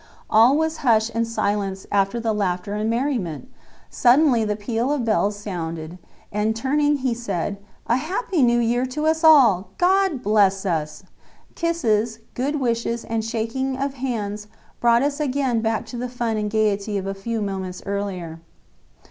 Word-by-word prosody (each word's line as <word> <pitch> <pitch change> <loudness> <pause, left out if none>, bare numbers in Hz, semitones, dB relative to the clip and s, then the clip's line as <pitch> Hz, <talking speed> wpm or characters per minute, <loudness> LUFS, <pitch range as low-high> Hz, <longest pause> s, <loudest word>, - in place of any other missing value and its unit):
All 230 +6 +6
was 320 0 0
hush 230 -4 +2
and 230 0 0
silence 200 -3 -2
after 200 +3 +1
the 225 -1 0
laughter 200 -1 -2
and 210 +1 -1
merriment! 235 - -2 0.4
Suddenly 250 -1 +4
the 210 -1 -1
peal 230 +5 -2
of 285 -5 -1
bells 210 -2 +1
sounded, 170 -4 -6 0.3
and 210 +2 0
turning 290 +5 +1
he 260 -3 -1
said: 200 -4 -3 0.3
"A 235 - +2
happy 360 - -1
New 240 -1 +4
Year 240 +2 +1
to 300 +4 -3
us 320 +1 +1
all! 235 - +6
God 370 -6 +2
bless 200 -2 +3
us." 155 -2 -2 0.5
Kisses, 230 -10 0 0.2
good 285 +4 -1
wishes 235 -2 -1
and 225 -1 -2
shaking 235 +4 -2
of 275 0 -2
hands 215 -6 -4 0.3
brought 235 +1 +4
us 285 +1 -1
again 265 -5 0
back 225 -1 -1
to 245 - -8
the 250 +1 -3
fun 235 -2 -2
and 210 -1 -1
gaiety 210 -1 0
of 195 - -4
a 195 - -2
few 225 +4 -4
moments 190 -3 -4
earlier. 190 -5 -4
225 Hz, 160 wpm, -22 LUFS, 205-260 Hz, 0.5 s, All